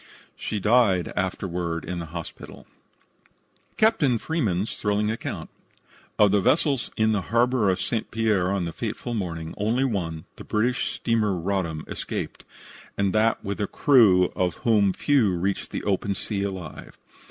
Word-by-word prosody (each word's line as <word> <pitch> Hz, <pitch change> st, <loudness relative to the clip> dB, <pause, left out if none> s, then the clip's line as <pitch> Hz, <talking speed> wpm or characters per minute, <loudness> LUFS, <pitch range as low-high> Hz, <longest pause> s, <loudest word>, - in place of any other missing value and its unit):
She 105 Hz, -, -3 dB
died 105 Hz, -4 st, +3 dB
afterward 90 Hz, -3 st, -2 dB
in 90 Hz, -1 st, -4 dB
the 85 Hz, -, -6 dB
hospital. 85 Hz, 0 st, -9 dB, 1.1 s
CAPTAIN 185 Hz, -, +3 dB
FREEMAN'S 110 Hz, -, -1 dB
THRILLING 105 Hz, +1 st, 0 dB
ACCOUNT 110 Hz, -, -5 dB, 0.7 s
Of 105 Hz, -2 st, +5 dB
the 100 Hz, 0 st, +3 dB
vessels 135 Hz, -, +2 dB
in 110 Hz, 0 st, +3 dB
the 105 Hz, -2 st, +1 dB
harbor 120 Hz, +1 st, +2 dB
of 95 Hz, -, +1 dB
St. 115 Hz, -2 st, -2 dB
Pierre 105 Hz, -5 st, +1 dB
on 100 Hz, -3 st, 0 dB
the 85 Hz, -, -5 dB
fateful 120 Hz, -, -4 dB
morning, 85 Hz, -6 st, -4 dB
only 115 Hz, +6 st, +1 dB
one, 85 Hz, -10 st, -2 dB
the -, -, -9 dB
British 120 Hz, +4 st, 0 dB
steamer 110 Hz, -4 st, +1 dB
Roddam, 85 Hz, -4 st, -2 dB
escaped, -, -, -5 dB, 0.5 s
and 100 Hz, -1 st, +1 dB
that 110 Hz, +1 st, +2 dB
with 100 Hz, +1 st, -3 dB
a 105 Hz, -, 0 dB
crew 100 Hz, -10 st, +5 dB
of 90 Hz, -2 st, 0 dB
whom 105 Hz, -4 st, +4 dB
few 115 Hz, -2 st, +2 dB
reached 95 Hz, +3 st, -2 dB
the -, -, -5 dB
open 100 Hz, 0 st, 0 dB
sea 100 Hz, +1 st, -3 dB
alive. 95 Hz, -6 st, -6 dB
100 Hz, 150 wpm, -25 LUFS, 90-115 Hz, 1.1 s, Of